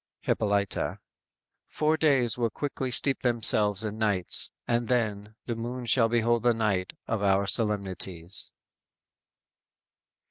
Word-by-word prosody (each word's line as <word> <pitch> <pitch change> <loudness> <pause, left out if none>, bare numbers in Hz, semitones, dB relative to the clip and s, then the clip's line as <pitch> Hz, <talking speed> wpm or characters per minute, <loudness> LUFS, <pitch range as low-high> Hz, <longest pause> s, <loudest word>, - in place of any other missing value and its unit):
"_ - - -24
Hippolyta: 100 -2 -1 0.7
_"Four 155 +1 0
days 140 -7 +2
will 120 -2 -1
quickly 135 +2 -4
steep 135 +2 +3
themselves 110 -4 +2
in 110 0 -5
nights; 100 -5 +3 0.2
And 120 0 0
then, 110 -4 -2
the 120 - -3
moon 120 +2 -6
shall 115 -1 +4
behold 120 0 +1
the 120 -1 +2
night 105 -5 -1
Of 115 -3 -3
our 100 0 +2
solemnities." 95 -4 -1
110 Hz, 120 wpm, -27 LUFS, 100-120 Hz, 0.7 s, shall